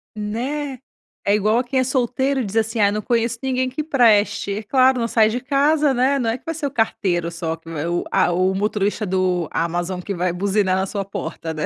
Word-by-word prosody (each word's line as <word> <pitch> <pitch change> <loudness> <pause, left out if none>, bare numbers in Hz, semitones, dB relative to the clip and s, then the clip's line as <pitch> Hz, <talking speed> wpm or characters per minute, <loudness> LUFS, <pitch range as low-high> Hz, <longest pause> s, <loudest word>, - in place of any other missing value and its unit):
Né? 255 +6 -3 0.5
É 200 +1 +3
igual 215 +2 +2
a - - 0
quem 260 +1 -1
é - - +3
solteiro 260 +1 0
diz 200 +2 -6
assim: 225 0 0
"Ai, 200 - +5
eu - - -2
não 215 - -2
conheço 235 +1 0
ninguém 255 -1 0
que 300 +4 -4
preste". 220 -8 +3
É - - -8
claro, 260 +2 +3
não 230 - 0
sai 220 -1 +4
de 245 +3 -3
casa, 285 +1 +2
né. 260 +3 +2
Não 230 -2 0
é 230 - -1
que - - -28
vai 325 -1 -3
ser 305 -2 -4
o 275 - -2
carteiro 180 -8 0
só, 165 -1 -3
que 165 0 -14
o 165 +2 -2
a - - +3
o 185 +2 +1
motorista 210 +1 -1
do 180 -3 0
Amazon 175 +2 -2
que 200 - -4
vai 180 0 0
buzinar 190 +1 +1
na 190 - 0
sua 200 0 -3
porta, 180 -4 -5
né? 155 -1 -3
215 Hz, 230 wpm, -21 LUFS, 185-255 Hz, 0.5 s, Ai